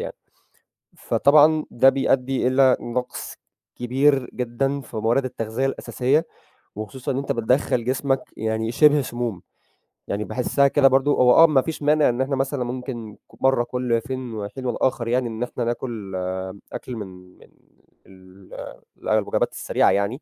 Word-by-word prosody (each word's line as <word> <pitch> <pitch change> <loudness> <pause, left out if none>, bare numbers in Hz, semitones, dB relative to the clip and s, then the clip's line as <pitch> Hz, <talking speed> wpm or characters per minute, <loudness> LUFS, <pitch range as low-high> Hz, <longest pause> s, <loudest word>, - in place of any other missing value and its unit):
يعني. - - -5 0.8
فطبعًا 155 +2 +4
ده 130 +3 +5
بيأدي 135 -1 0
إلى 130 0 +4
نقص 125 +1 -5 0.4
كبير 135 +2 +1
جدًا 135 +3 -2
في 115 - -9
موارد 115 +5 +1
التغذية 115 +1 -3
الأساسية، 135 +3 0 0.5
وخصوصًا 125 +5 -5
إن 130 - -2
أنت 140 - -1
بتدخّل 125 +1 0
جسمك 135 +1 0
يعني 110 +1 -2
شبه 150 +3 +5
سموم. 120 -7 -4 0.7
يعني 105 +1 -2
باحسها 140 +5 +1
كده 140 -1 +4
برضه 135 +2 +2
هو 125 -1 +5
آه 165 - +8
ما 140 -4 +3
فيش 160 -2 -5
مانع 150 0 +4
إن 120 +1 -1
إحنا 135 +1 0
مثلًا 135 -1 -1
ممكن 120 -3 -6
ك - - -21
مرّة 135 -2 +3
كُل 120 -1 -1
فين 130 -2 -6
وحين 110 +5 -6
والآخر 125 -1 -1
يعني 125 +1 +1
إن 110 +1 -6
إحنا 125 0 -3
ناكل 115 -4 -4 0.6
أكل 125 - -6
من 105 -3 -6 0.3
من - - -19 0.6
ال 95 0 -17 0.6
الوجبات - - +1
السريعة - - +1
يعني. 100 +8 -1
125 Hz, 150 wpm, -23 LUFS, 115-135 Hz, 0.8 s, آه